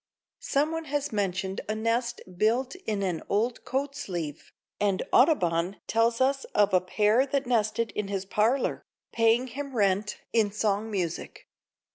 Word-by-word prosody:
Some 295 +2 0
one 325 0 -3
has 290 0 -2
mentioned 195 -2 -1
a 215 - 0
nest 230 +2 -1
built 235 +7 +1
in 205 -2 -1
an 180 -4 -1
old 225 +4 0
coat 275 +2 -2
sleeve, 170 - -5 0.3
and 200 -2 +1
Audubon 185 - +3
tells 230 +1 +2
us 270 +1 +2
of 205 -1 +4
a 185 - +5
pair 215 +7 +2
that 275 0 0
nested 230 -2 +1
in 210 -1 -3
his 195 -1 -3
parlor, 225 +7 +1 0.3
paying 230 +2 +3
him 270 +2 -6
rent 200 -1 +1 0.2
in 220 -3 +3
song 210 +1 0
music. 180 -6 -4
220 Hz, 150 wpm, -27 LUFS, 195-255 Hz, 0.3 s, a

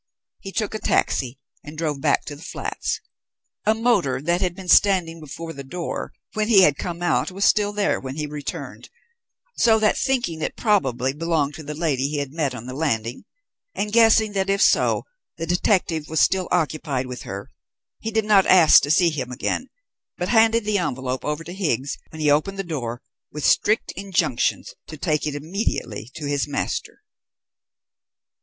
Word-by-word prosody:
He 195 - -8
took 215 +1 -2
a 215 - -3
taxi 130 - 0 0.3
and 150 +1 -10
drove 150 -4 -2
back 145 -1 +2
to 145 - -6
the 145 - -14
flats. 185 - -4 0.7
A 215 - +4
motor 220 - +2
which 170 +6 0
had 180 -2 0
been 190 -1 -10
standing 175 -3 +4
before 165 +2 -7
the 140 - -8
door 170 +6 -5 0.2
when 215 0 0
he 205 -5 +7
had 150 -5 +5
come 175 +2 -5
out 175 - +1
was 195 +2 -1
still 205 -1 +3
there 205 -1 0
when 130 0 -6
he 150 0 -3
returned; 150 -1 -7 0.7
so 225 -2 +5
that, 215 -1 +2
thinking 240 -12 -1
it - - -2
probably 135 - +1
belonged 155 -2 0
to 160 - -8
the 150 0 -6
lady 145 -5 0
he 150 - -3
had 140 -1 -3
met 145 -5 -1
on 120 -1 -8
the 130 - -6
landing, 125 -5 -2 0.5
and 210 0 -2
guessing 225 -2 +5
that 195 -1 -1
if 200 0 +2
so - - +3 0.3
the 165 - -3
detective 175 -3 +1
was 160 - 0
still 190 -1 +2
occupied 150 -6 -1
with 125 -2 -7
her, 100 +1 -7 0.5
he 220 - -4
did 220 -1 0
not 205 -3 +5
ask 175 -4 +7
to 145 - -3
see 170 +2 +4
him 130 -5 -4
again, 250 - -2 0.5
but 180 +1 -2
handed 225 -1 +4
the 210 -1 +1
envelope 130 -5 -3
over 150 +2 -3
to 170 +2 -8
Higgs 145 - -2
when 160 - -9
he 150 -1 +3
opened 155 +7 +1
the 195 - -2
door, 125 -9 -5 0.3
with 150 0 -4
strict 215 +2 +2
injunctions 175 -10 -1
to 155 - -9
take 150 -1 0
it 145 - -3
immediately 145 - -3
to 155 -3 -6
his 145 -1 0
master. 145 - -4
165 Hz, 185 wpm, -23 LUFS, 140-195 Hz, 0.7 s, he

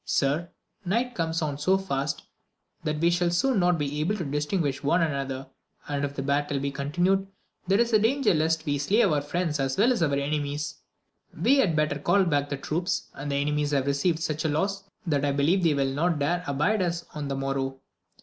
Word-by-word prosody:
Sir, 150 +5 0 0.3
night 235 +7 0
comes 165 -3 -1
on 145 -2 -3
so 185 +6 +3
fast 140 -7 -2 0.6
that 155 -1 -1
we 170 +2 +3
shall 175 0 +2
soon 205 +7 +2
not 175 -1 +3
be 145 -1 -2
able 175 +8 +1
to 175 - -3
distinguish 150 0 -1
one 170 +4 +2
an 155 -3 0
other, 135 -1 -4 0.4
and 145 -1 -2
if 140 0 -3
the 135 - -3
battle 145 0 0
be 140 +1 -2
continued 175 +8 0 0.4
there 195 +3 +3
is 235 0 +2
danger 225 +2 +3
lest 160 0 +1
we 145 -2 0
slay 205 +11 +3
our 150 -7 +2
friends 155 +1 -2
as 135 -1 -1
well 230 +5 +4
as 240 - 0
enemies; 145 0 -1 0.6
we 275 - +4
had 180 -11 +3
better 150 -1 +1
call 200 +7 +3
back 145 -5 0
the 140 - -2
troops, 170 +6 -2
the - - -13 0.2
enemies 145 +1 0
have 140 -2 +1
received 140 +4 +1
such 155 -2 -2
loss, 195 +6 -1 0.2
that 145 -5 0
I 145 - +2
believe 155 +7 +2
they 165 -4 +3
will 135 -1 0
not 165 +3 +1
dare 170 +5 0
abide 150 +10 +1
us 170 -1 -1
on 150 -2 -4
the 140 - -2
morrow. 135 0 -2
155 Hz, 200 wpm, -26 LUFS, 140-180 Hz, 0.6 s, well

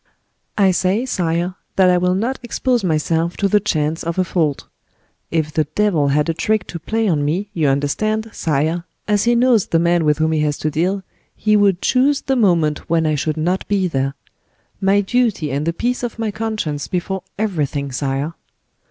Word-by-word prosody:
"I 195 -2 +5
say, 190 +6 +1
sire, 175 -5 -1 0.2
that 185 -1 +5
I 180 - +3
will 180 +1 +1
not 235 +7 -1
expose 245 -1 0
myself 165 0 0
to 200 - +2
the 210 +2 +3
chance 160 -5 -1
of 170 +1 -3
a 185 - +3
fault. 160 -5 -1 0.6
If 155 -2 -1
the 155 0 +1
devil 195 -9 +2
had 150 +2 +2
a 165 - +1
trick 210 +4 0
to 170 - -5
play 220 +7 -1
on 155 -6 +1
me, 185 +8 -1
you 160 -5 +1
understand, 215 +11 0
sire, 160 +3 -1 0.2
as 205 0 +2
he 240 0 +3
knows 235 -3 +3
the 165 - +2
man 170 0 +2
with 150 -1 +2
whom 160 0 +1
he 160 - +1
has 150 -1 0
to 155 - -2
deal, 185 +6 0 0.3
he 215 0 +2
would 200 -3 +3
chose 270 +2 +3
the 270 - 0
moment 170 -10 +1
when 165 -1 +2
I 155 - +2
should 150 +1 -1
not 175 +4 -1
be 195 -2 +1
there. 135 -3 -1 0.7
My 195 +1 +3
duty 205 - 0
and 145 +4 -2
the - - +3
peace 245 +8 -2
of 240 -3 -4
my 225 -2 -2
conscience 215 -10 -3
before 190 +1 -2 0.2
everything, 150 -9 -2
sire." 135 +4 -2
175 Hz, 195 wpm, -19 LUFS, 155-210 Hz, 0.7 s, I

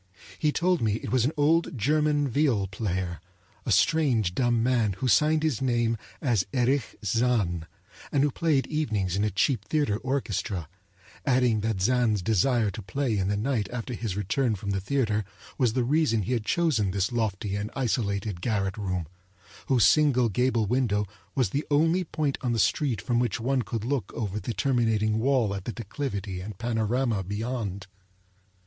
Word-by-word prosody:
He 150 - +2
told 180 +2 +1
me 110 -3 +1
it 110 - -4
was 125 -2 +3
an 140 - +1
old 160 +1 +2
German 150 +4 +2
viol 130 -6 +1
player, 95 -4 -3 0.5
a - - +1
strange 125 - +3
dumb 120 +1 +1
man 120 -5 +2
who 130 +8 -3
signed 155 +4 +3
his 150 -8 0
name 120 -3 +1 0.3
as 120 -9 +2
Erich 130 +1 +1
Zann, 105 -7 +1 0.4
and 140 - +2
who 145 - +2
played 150 -3 +1
evenings 110 - -1
in 100 - +1
a 105 - +2
cheap 105 +3 +1
theater 145 -5 0
orchestra; 110 - -2 0.6
adding 125 -4 +2
that 105 -3 -1
Zann's 115 -4 +2
desire 110 +1 +2
to 110 - -7
play 115 +5 -1
in 95 -2 0
the 100 +1 0
night 110 -3 -1
after 125 0 -4
his 110 -4 -4
return 110 +4 0
from 100 +1 -4
the 95 -1 -1
theater 110 -1 0 0.4
was 125 -5 +2
the 125 - +1
reason 135 -5 +2
he 125 - -1
had 115 -3 -1
chosen 150 - +1
this 100 +2 -1
lofty 105 -4 -1
and 100 +1 -3
isolated 105 -7 -1
garret 95 -2 -1
room, 95 -4 -2 0.6
whose 125 -5 +4
single 135 -6 +4
gable 120 +1 +1
window 105 -3 +1 0.3
was 125 -8 +1
the 145 +2 -2
only 165 +5 +3
point 155 -3 -2
on 120 -2 0
the - - 0
street 125 +1 +1
from 120 -2 0
which 120 -4 0
one 130 +3 +1
could 110 0 -4
look 130 -7 -2
over 105 -2 -3
the 115 +1 -5
terminating 110 -5 +1
wall 125 -4 +2
at 100 -1 -5
the - - -2
declivity 100 -5 -4
and 100 0 -7
panorama 115 -1 0
beyond. 105 -1 -4
115 Hz, 175 wpm, -27 LUFS, 105-135 Hz, 0.6 s, whose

